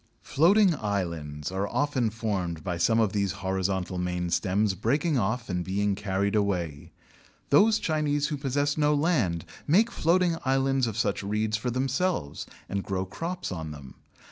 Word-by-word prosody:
Floating 190 +5 +4
islands 85 - -3
are 95 +2 -1
often 140 -4 0
formed 95 -8 -3
by 90 - -2
some 110 +7 +2
of 110 -4 +2
these 100 -3 0
horizontal 95 -1 -2
main 90 -1 -2
stems 100 +2 +1
breaking 140 - +1
off 115 +3 -1
and 90 -2 -2
being 100 +2 0
carried 100 +1 -1
away. 90 -8 -1 0.6
Those 215 +10 +6
Chinese 150 -3 0
who 150 - -2
possess 145 +2 0
no 150 0 +3
land 130 - +1 0.2
make 210 +10 +4
floating 170 -1 +2
islands 135 -1 +2
of 110 -2 -4
such 110 -4 0
reeds 105 +2 -1
for 110 +3 -2
themselves, 130 - -1 0.2
and 100 0 -2
grow 95 -1 -2
crops 165 - -5
on 80 -3 -5
them. 70 -3 -10
105 Hz, 155 wpm, -27 LUFS, 95-145 Hz, 0.6 s, Those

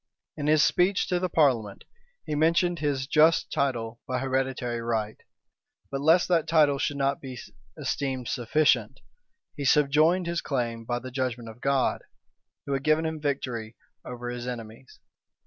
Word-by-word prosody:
In 150 -1 -3
his 155 0 +5
speech 185 +2 +2
to 180 -1 +1
the 185 0 -1
parliament, 120 - +1 0.4
he - - -4
mentioned 170 +3 +2
his 145 -3 -1
just 155 +3 +3
title 120 -4 -2
by 130 - -1
hereditary 130 -2 -2
right: 110 -2 -2 0.7
but 135 0 -3
lest 165 +4 +4
that 165 -3 +2
title 150 -3 +3
should 145 0 -1
not 140 0 0
be 130 -2 -8 0.4
esteemed 130 -3 -3
sufficient, 125 -2 +1 0.6
he 145 - -5
subjoined 150 +6 +3
his 170 0 -2
claim 120 -4 -3
by 120 +1 -1
the 130 +1 -7
judgment 125 -3 -3
of 115 +3 -13
God, 135 -1 +1 0.6
who 140 - -2
had 135 - -1
given 155 +1 +2
him 160 -1 -3
victory 125 -6 -3 0.3
over 120 -1 -6
his 120 0 -6
enemies. 115 +1 -8
135 Hz, 155 wpm, -27 LUFS, 120-155 Hz, 0.7 s, his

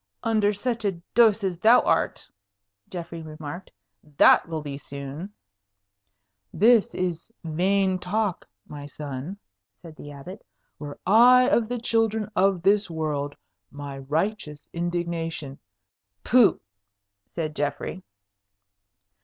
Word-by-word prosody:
"Under 215 -2 +2
such 230 +3 -3
a 200 -2 +1 0.2
dose 220 -3 +5
as 180 -3 -2
thou 225 +5 +6
art," - - 0 0.6
Geoffrey 170 -2 -7
remarked, 155 +3 -8 0.5
"that - - +6
will 160 -2 -4
be 145 -2 -5
soon." 140 +6 -8 1.2
"This 225 +1 +4
is 180 +2 -3
vain 185 +3 +1
talk, 200 +1 -2 0.2
my 145 -1 -8
son," 145 +5 -7 0.4
said 165 -2 -12
the 145 - -11
Abbot. 145 +8 -10 0.4
"Were 145 -1 -7
I 245 +5 +6
of 230 -1 +2
the 245 - -2
children 225 -2 0
of 190 -3 +2
this 200 +1 +3
world, 150 -3 -3 0.3
my 140 -1 -8
righteous 150 +2 -3
indignation 170 -4 -3 0.3
" 100 +1 -56
"Pooh!" 245 -3 +5 0.8
said 155 -3 -3
Geoffrey. 145 +5 -3
175 Hz, 115 wpm, -25 LUFS, 150-210 Hz, 1.2 s, thou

